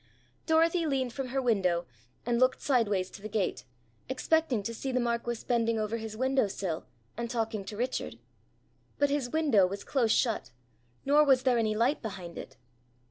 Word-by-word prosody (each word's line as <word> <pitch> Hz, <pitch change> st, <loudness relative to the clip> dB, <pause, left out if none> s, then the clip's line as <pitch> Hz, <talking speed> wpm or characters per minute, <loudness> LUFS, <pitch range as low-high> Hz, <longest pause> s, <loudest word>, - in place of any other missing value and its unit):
Dorothy 330 Hz, +1 st, +3 dB
leaned 260 Hz, -4 st, -1 dB
from 270 Hz, 0 st, -4 dB
her 265 Hz, +2 st, -1 dB
window, 190 Hz, -9 st, +1 dB, 0.4 s
and 235 Hz, 0 st, +1 dB
looked 255 Hz, 0 st, +3 dB
sideways 210 Hz, -8 st, +1 dB
to -, -, -11 dB
the 215 Hz, -, -6 dB
gate, 205 Hz, -9 st, -1 dB, 0.4 s
expecting 265 Hz, -3 st, +1 dB
to 230 Hz, -, -3 dB
see 265 Hz, +3 st, -4 dB
the 255 Hz, -, +1 dB
marquis 235 Hz, -1 st, -2 dB
bending 230 Hz, -2 st, +1 dB
over 215 Hz, +1 st, -1 dB
his 220 Hz, -1 st, -7 dB
window 260 Hz, -2 st, +2 dB
sill, 185 Hz, -4 st, -4 dB, 0.3 s
and 235 Hz, 0 st, -3 dB
talking 225 Hz, -3 st, -2 dB
to 205 Hz, +1 st, -7 dB
Richard. 250 Hz, +3 st, -2 dB, 0.8 s
But 285 Hz, -1 st, +2 dB
his 280 Hz, -4 st, 0 dB
window 265 Hz, -11 st, +3 dB
was 200 Hz, +2 st, -6 dB
close 240 Hz, -6 st, +1 dB
shut, 230 Hz, -2 st, +1 dB, 0.6 s
nor 290 Hz, +2 st, +5 dB
was 265 Hz, -3 st, +4 dB
there 250 Hz, -2 st, +3 dB
any 215 Hz, -1 st, +1 dB
light 240 Hz, +7 st, +1 dB
behind 190 Hz, -6 st, -7 dB
it. -, -, -10 dB
235 Hz, 175 wpm, -30 LUFS, 215-265 Hz, 0.8 s, nor